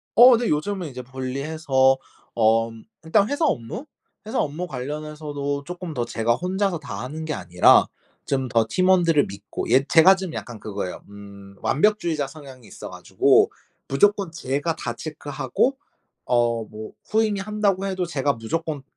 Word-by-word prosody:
어 245 +1 +9
네. 235 0 -1
요즘은 175 +4 -1
이제 125 -2 -8
분리해서 130 +1 0 0.4
엄 115 0 +1 0.2
일단 200 +6 +2
회사 285 +3 +1
업무? 225 - -3 0.4
회사 225 +4 -2
업무 155 +5 -2
관련해서도 145 0 -4
쪼끔 175 0 -7
더 120 - -1
제가 115 0 0
혼자서 185 +3 -1
다 140 - -7
하는 155 +5 -6
게 155 - -3
아니라 90 - +4 0.4
좀 135 -2 0
더 115 -1 +2
팀원들을 175 -4 +3
믿고 100 +1 -7
예 130 +3 +5
제가 175 +4 +7
좀 190 -3 -6
약간 120 -3 -7
그거예요. 100 -3 -5
음 100 -1 -13
완벽주의자 170 -4 +1
성향이 135 -5 -13
있어가지고 - - +1 0.4
무조건 200 +6 +2
제가 160 0 -2
다 120 - -4
체크하고 145 - -2 0.5
어 120 -2 +1
뭐 110 0 -9 0.2
후임이 215 -2 +1
한다고 200 -1 0
해도 190 -2 -1
제가 145 -4 0
무조건 150 +6 -4
145 Hz, 315 characters per minute, -23 LUFS, 120-180 Hz, 0.5 s, 어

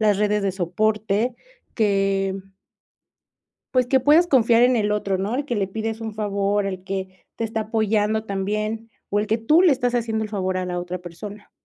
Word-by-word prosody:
las 210 -2 +3
redes 210 -1 +1
de 195 - +1
soporte, 215 +5 0 0.4
que 195 -3 +1 1.4
pues 255 -2 +3
que, 265 0 +4
puedes 305 +7 +5
confiar 235 -5 +4
en 250 0 +4
el 210 -1 +1
otro, 200 -2 0
¿no?, 205 +6 -2
el 285 - -2
que 245 -5 -2
le 195 -2 0
pides 220 +2 -4
un 220 -1 -5
favor, 205 -1 0
el 185 -2 -4
que 190 -1 -6
te 230 - -3
está 220 0 -2
apoyando 215 0 0
también, 215 +3 -3 0.2
o 205 - +1
el 210 - -2
que 220 +2 +1
tú 300 +10 +4
le 360 - +6
estás 245 -1 -1
haciendo 225 -2 -1
el 215 - -5
favor 185 -3 -1
a 185 - -2
la 180 -1 -3
otra 180 0 -5
persona. 200 +4 -10
210 Hz, 195 wpm, -23 LUFS, 195-225 Hz, 1.4 s, le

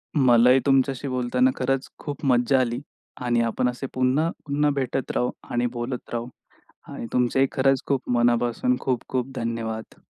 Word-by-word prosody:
मलाही 125 -2 +5
तुमच्याशी 135 0 +2
बोलताना 125 0 +1
खरंच 135 +1 -1
खूप 145 0 -6
मज्जा 130 +1 +3
आली. 120 -1 0 0.5
आणि 120 -1 +2
आपण 115 +2 0
असे 125 +2 -5
पुन्हा, 130 +6 +2 0.2
पुन्हा 145 +1 +1
भेटत 135 -1 -2
राहू 125 - +1 0.2
आणि 120 0 +1
बोलत 120 +1 -5
राहू. 120 0 -2 0.7
आणि - - -6
तुमचेही 125 +2 +2
खरंच 135 0 +2
खूप 135 -3 -1
मनापासून 120 +1 +2
खूप-खूप 130 0 -2
धन्यवाद. 115 -1 -4
125 Hz, 140 wpm, -24 LUFS, 120-135 Hz, 0.7 s, मलाही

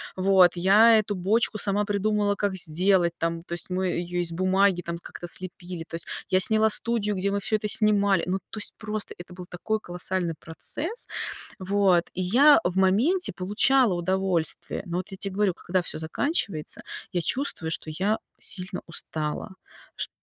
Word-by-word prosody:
Вот, 185 -1 +4
я 215 +5 +6
эту 205 0 -5
бочку 210 +4 0
сама 205 0 +1
придумала, 205 0 0
как 200 -1 -1
сделать 175 +1 +3
там, 165 0 -3
то 170 - -8
есть 175 - -3
мы 185 +1 -1
ее 175 0 -2
из 170 -1 0
бумаги 185 +1 +2
там 170 0 -4
как-то 175 - -10
слепили, 180 -1 -5
то - - -7
есть 165 - -5 0.2
я 185 - +3
сняла 220 +3 +6
студию, 210 -1 0
где 190 +1 -1
мы - - -1
всё 210 +2 0
это 215 0 -2
снимали. 200 -4 +2
Ну, 185 +1 0
то - - -8
есть 205 - -5
просто 215 -1 -4
это 180 - -14
был 180 0 -9
такой 175 -1 -11 0.2
колоссальный 180 -1 -2
процесс. 320 - -2 0.5
Вот 190 -2 +2
и 185 - -3
я 270 +11 +5
в 175 +1 -1
моменте 235 - +3
получала 210 +4 +3
удовольствие. 185 -1 -1
Но 175 -1 -4
вот 185 - -5
я 190 - -8
те 195 - -2
говорю: 195 -1 0
когда 185 +1 -2
всё 165 - -6
заканчивается, 160 - -2 0.3
я 175 - 0
чувствую, 180 -7 0
что - - -2
я 195 +7 0 0.2
сильно 185 -1 -3
устала. 155 -2 -4 0.5
Ш - - -1
190 Hz, 175 wpm, -25 LUFS, 175-210 Hz, 0.5 s, я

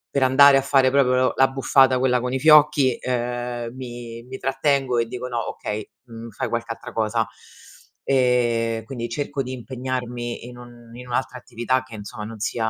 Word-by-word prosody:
per 140 - +3
andare 140 +2 +7
a 135 - +4
fare 135 -1 +3
proprio 130 -2 +3
l'abbuffata 135 -1 +3
quella 125 -1 +2
con 125 +1 -3
i 130 - -1
fiocchi, 150 -4 +5
uhm, 120 -1 -3
mi 120 -2 -8
mi 130 +2 -8
trattengo 135 -1 0
e 115 -1 +1
dico: 125 +2 -6
"No, 120 -2 -3
okay. 105 0 -5 0.2
Mhmm, 115 -1 -10
fai 110 - -4
qualche 115 0 -3
altra 120 +1 -8
cosa". 110 0 0 0.8
Ehm, 120 -3 +1
quindi 120 -1 -5
cerco 140 +3 -3
di 130 - -7
impegnarmi 125 -1 -5
in 125 0 -11
un 120 -1 -14
in 125 +1 -10
un'altra 125 +1 -2
attività 120 +3 -2
che, 125 -3 -12
insomma, 105 0 -8
non 110 +1 -8
sia 110 +2 -1
125 Hz, 175 wpm, -22 LUFS, 115-130 Hz, 0.8 s, andare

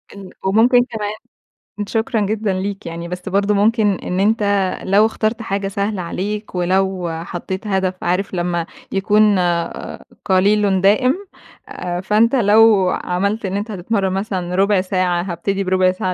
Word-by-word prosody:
إن 195 -2 -10 0.2
وممكن 240 +5 +4
كمان 215 -4 -4 0.7
شكرًا 225 0 -1
جدًا 210 0 -1
ليك 195 +1 -4
يعني، 170 0 -6
بس 180 +2 -6
برضو 200 +2 +1
ممكن 210 0 +3
إن 180 +1 -4
أنتَ 215 +2 +2 0.4
لو 200 +3 +4
اخترت 220 +1 -1
حاجة 200 -2 -2
سهلة 200 0 -2
عليك، 205 +4 -4
ولو 185 0 0
حطيت 190 +4 -6
هدف 190 -2 0
عارف 185 +3 -1
لما 175 -1 -1 0.3
يكون 205 +1 +3 0.9
قليلٌ 195 0 +3
دائم؟ 235 +8 +3 0.9
فأنتَ 220 +6 +3
لو 215 -4 +5
عملت 200 +4 -1
إن 190 +1 -2
أنتَ 210 +2 -4
هتتمرّن 195 0 -1
مثلًا 190 -3 -3
ربع 195 0 +3
ساعة، 185 -2 0
هابتدي 195 +2 -2
بربع 185 0 +2
ساعة 185 0 -2
195 Hz, 140 wpm, -19 LUFS, 185-210 Hz, 0.9 s, لو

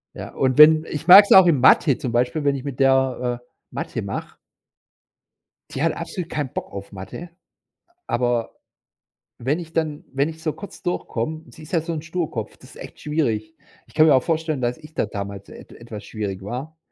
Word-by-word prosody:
Ja, - - -8
und 130 0 0
wenn 155 +1 +8
ich 150 - -5
mag's 200 +3 +9
auch 190 -1 +9
in 150 -6 +3
Mathe 135 +1 +5
zum 125 - -4
Beispiel, 125 +5 0
wenn 140 -1 +2
ich 135 - -6
mit 140 -2 -6
der, 130 -2 +2
äh, - - -29 0.3
Mathe - - -4
mach - - -6 1.3
Die 135 - -4
hat 165 - +2
absolut 170 0 -6
keinen 145 -4 -3
Bock - - -5
auf 100 +1 -8
Mathe, 95 - -9 0.8
aber 120 -1 -1 0.8
wenn 140 +8 -1
ich 165 -1 -9
dann 155 -3 -2
wenn 140 +3 +1
ich 160 0 -10
so 155 - -1
kurz 200 - -11
durchkomm 160 -3 -3
sie 160 - -15
ist - - -13
ja 165 - +2
so 165 +1 -4
'n 155 - -4
Sturkopf, 160 -9 -4
das - - -16
ist - - -14
echt - - -11
schwierig. 150 0 -2 0.3
Ich - - -23
kann 155 0 +5
mir 140 - +6
auch 130 - +2
vorstellen, 160 -3 -1
dass 120 0 -1
ich 155 0 -15
da - - 0
damals 100 -1 -7
et - - -13
etwas 115 -3 -10
schwierig 100 -3 -5
war 130 +10 -6
145 Hz, 200 wpm, -22 LUFS, 120-160 Hz, 1.3 s, mag's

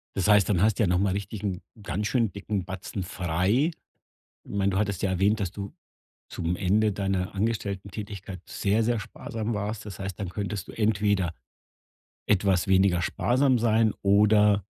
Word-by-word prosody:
Das 95 - 0
heißt, 105 -3 +5
dann 90 -4 +2
hast 110 0 +3
du - - +4
ja 100 - +2
noch 90 +1 +2
mal 100 -1 +2
richtig 100 +1 -4
'n 95 -2 -2 0.2
ganz 105 +1 -2
schönen 115 -5 +1
dicken 100 -2 -3
Batzen 95 0 -5
frei. 95 - +1 0.8
Mein, 100 -1 0
du 95 - 0
hattest 100 -3 -1
ja 100 - +1
erwähnt, 100 +4 +2
dass 95 -2 -2
du 100 -1 -6 0.6
zum 85 +2 -2
Ende 105 +3 +2
deiner 95 -2 -2
Angestelltentätigkeit 100 -2 -4
sehr, 105 +3 0
sehr 115 0 +1
sparsam 110 +2 -5
warst. 105 +1 -3
Das 100 -4 -8
heißt, 95 -2 -5
dann 100 -3 -3
könntest 100 0 -4
du - - -8
entweder 100 -5 +1 0.9
etwas 95 -2 +2
weniger 95 -2 +4
sparsam 130 +5 +2
sein 110 -1 +3
oder 105 0 +4
100 Hz, 165 wpm, -27 LUFS, 95-105 Hz, 0.9 s, heißt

